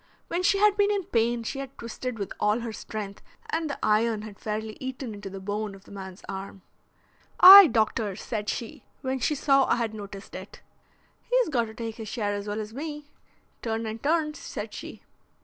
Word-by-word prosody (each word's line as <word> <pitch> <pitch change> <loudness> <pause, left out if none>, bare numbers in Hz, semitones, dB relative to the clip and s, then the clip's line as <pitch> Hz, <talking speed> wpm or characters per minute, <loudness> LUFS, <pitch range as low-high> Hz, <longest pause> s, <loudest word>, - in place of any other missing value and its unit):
When 345 - 0
she 390 +2 +3
had 415 0 +4
been 410 0 +4
in 405 -2 0
pain 235 -7 0
she 270 +5 -4
had 275 -1 -7
twisted 235 +1 -5
with 200 -3 -4
all 210 +3 +2
her 230 -1 -5
strength 205 -2 -6 0.3
and 320 -1 -1
the 280 - -3
iron 215 0 +2
had 210 -2 -10
fairly 215 0 -4
eaten 260 -3 -5
into 205 -1 -7
the 195 0 -7
bone 205 +1 -3
of 195 - -16
the - - -17
man's 190 -2 -9
arm. 195 0 -7 0.8
'Aye, 390 0 +12
doctor,' 220 -4 0
said 210 0 -4
she, 230 - -5 0.2
when 265 -1 -2
she 300 +5 +1
saw 275 -1 +4
I - - +3
had 230 -2 -2
noticed 200 -2 -9
it. 190 +2 -10 0.6
'He's - - +1
got 240 -6 +1
to 220 0 -11
take 225 -1 -5
his 220 -2 -7
share 205 -2 -2
as 205 0 -4
well 205 +1 -2
as 215 0 -6
me. 295 +1 -6 0.5
Turn 225 0 -2
and 220 +1 -5
turn,' 305 0 +1
said 290 - -7
she." - - -9
225 Hz, 200 wpm, -27 LUFS, 210-275 Hz, 0.8 s, Aye